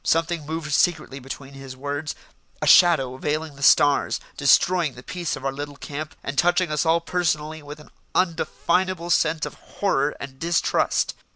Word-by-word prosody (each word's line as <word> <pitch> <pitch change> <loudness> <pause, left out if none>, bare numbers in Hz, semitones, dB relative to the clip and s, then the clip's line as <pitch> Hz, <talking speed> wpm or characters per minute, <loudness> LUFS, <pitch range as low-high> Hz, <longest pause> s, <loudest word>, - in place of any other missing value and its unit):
Something 165 -2 0
moved 160 -1 -4
secretly 155 -5 +1
between 135 +1 -9
his 135 -1 -10
words, 145 +1 -4 0.4
a - - -2
shadow 135 -8 +5
veiling 150 +2 -3
the 140 - -14
stars, 145 0 +4 0.2
destroying 150 +2 +3
the 125 - -12
peace 175 +2 -3
of 135 - -9
our 135 - +1
little 145 +1 -7
camp, 150 +2 -7
and 135 +1 -2
touching 175 -1 +2
us 150 +2 0
all 165 +1 +3
personally 160 -3 -1
with 145 +1 -10
an 150 - -16 0.2
undefinable 180 0 0
sense 160 -1 +2
of - - -7
horror 150 -8 -1
and 135 -1 -9
distrust. 170 0 +1
155 Hz, 165 wpm, -23 LUFS, 140-170 Hz, 0.4 s, shadow